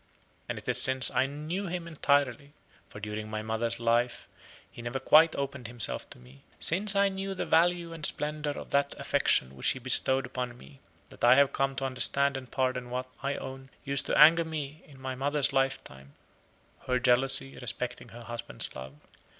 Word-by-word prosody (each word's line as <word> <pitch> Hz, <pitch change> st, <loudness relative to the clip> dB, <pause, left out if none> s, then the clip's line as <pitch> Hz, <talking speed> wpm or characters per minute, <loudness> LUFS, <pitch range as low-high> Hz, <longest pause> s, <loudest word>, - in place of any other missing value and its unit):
And -, -, -3 dB
it -, -, -11 dB
is -, -, +4 dB
since 130 Hz, -2 st, +6 dB
I 130 Hz, +1 st, +1 dB
knew 155 Hz, +8 st, -5 dB
him 175 Hz, -1 st, -5 dB
entirely 140 Hz, -3 st, 0 dB, 0.4 s
for -, -, -11 dB
during 105 Hz, +1 st, -6 dB
my 110 Hz, 0 st, -4 dB
mother's 110 Hz, +1 st, -2 dB
life 120 Hz, +1 st, 0 dB, 0.4 s
he -, -, -11 dB
never 120 Hz, +2 st, -4 dB
quite 155 Hz, +4 st, +5 dB
opened 140 Hz, -3 st, -5 dB
himself 120 Hz, -1 st, -3 dB
to -, -, -9 dB
me 65 Hz, +2 st, -18 dB, 0.2 s
since 200 Hz, +5 st, +2 dB
I 200 Hz, 0 st, +4 dB
knew 195 Hz, 0 st, -4 dB
the -, -, -3 dB
value 170 Hz, 0 st, +2 dB
and 165 Hz, -2 st, -10 dB
splendor 150 Hz, 0 st, -1 dB
of 145 Hz, -, -7 dB
that 140 Hz, 0 st, 0 dB
affection 65 Hz, +1 st, +1 dB
which 65 Hz, -, -1 dB
he -, -, -1 dB
bestowed 130 Hz, +1 st, +4 dB
upon 125 Hz, -1 st, -5 dB
me, 70 Hz, 0 st, -16 dB, 0.3 s
that -, -, -14 dB
I 120 Hz, +1 st, +7 dB
have 140 Hz, 0 st, +3 dB
come 135 Hz, 0 st, -1 dB
to 135 Hz, -, -2 dB
understand 140 Hz, +2 st, +1 dB
and 130 Hz, -2 st, -7 dB
pardon 130 Hz, -1 st, -2 dB
what, 125 Hz, +1 st, -3 dB, 0.2 s
I 140 Hz, +1 st, -2 dB
own, 135 Hz, 0 st, -8 dB
used 140 Hz, 0 st, -2 dB
to -, -, 0 dB
anger 165 Hz, +3 st, +7 dB
me 155 Hz, -1 st, -6 dB
in 140 Hz, -3 st, -16 dB
my 130 Hz, 0 st, -5 dB
mother's 140 Hz, +1 st, -1 dB
lifetime, 135 Hz, -, -3 dB, 0.7 s
her 125 Hz, -, +1 dB
jealousy 130 Hz, +2 st, +2 dB
respecting 120 Hz, +1 st, -3 dB
her 120 Hz, +1 st, -11 dB
husband's 120 Hz, 0 st, -4 dB
love. 65 Hz, +1 st, -9 dB
135 Hz, 185 wpm, -28 LUFS, 120-145 Hz, 0.7 s, I